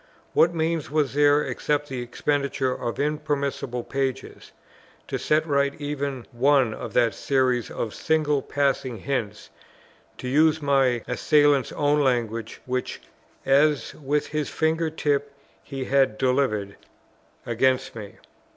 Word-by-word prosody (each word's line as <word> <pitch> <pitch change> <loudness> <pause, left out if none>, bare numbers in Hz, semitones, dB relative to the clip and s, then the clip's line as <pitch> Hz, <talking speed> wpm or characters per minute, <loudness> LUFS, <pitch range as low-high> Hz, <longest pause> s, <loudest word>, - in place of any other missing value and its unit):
What 170 - +5
means 165 -1 -1
was 150 -2 0
there, 145 +1 +4
except 150 0 -1
the 130 -3 -4
expenditure 140 +1 -1
of 120 -2 -4
interminable 140 -4 -2
pages, 135 0 -4 0.6
to - - -3
set 155 +1 +1
right 140 -2 0
even 140 -3 -4
one 130 -1 +3
of - - -7
that 120 -2 +3
series 130 -4 0
of 110 - -4
"single 150 -3 +1
passing 135 -3 -1
hints," 110 -3 -4 0.7
to - - -6
use 155 +4 +3
my 135 -5 +2
Assailant's 145 +2 +3
own 145 0 +2
language, 115 -4 -1
which, 125 0 -3 0.5
"as 145 +2 +3
with 145 +1 -1
his 150 -1 -3
finger 160 +1 0
tip 145 -2 -1 0.3
he 135 -2 -5
had 135 -6 +2
delivered" 125 -7 0 0.7
against 130 +2 +1
me? 105 -3 -9
140 Hz, 125 wpm, -24 LUFS, 125-145 Hz, 0.7 s, What